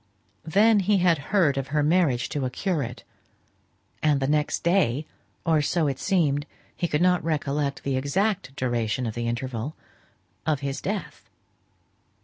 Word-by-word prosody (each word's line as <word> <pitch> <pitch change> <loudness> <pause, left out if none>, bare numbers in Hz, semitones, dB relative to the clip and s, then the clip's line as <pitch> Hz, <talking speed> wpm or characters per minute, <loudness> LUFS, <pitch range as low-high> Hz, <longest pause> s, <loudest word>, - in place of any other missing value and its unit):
Then 210 +6 +5
he 200 +1 +3
had 175 -4 +3
heard 170 -9 +3
of 135 - -4
her 150 +2 +1
marriage 150 -6 +2
to 145 - -2
a 130 - 0
curate; 140 - -3 1.0
and 150 -2 +3
the 135 - 0
next 150 +1 0
day 165 -6 +2 0.4
(or 160 -3 +3
so 160 +2 +1
it 135 -2 -1
seemed, 150 -7 +1 0.3
he 175 - -1
could 150 +1 +1
not 180 -1 +3
recollect 145 -3 -1
the 135 -2 0
exact 140 0 -1
duration 120 -2 -1
of 110 - -3
the 120 +1 -3
interval), 120 +3 -3 0.7
of 150 -3 0
his 140 -1 -3
death. 205 0 -5
150 Hz, 150 wpm, -25 LUFS, 135-175 Hz, 1.0 s, Then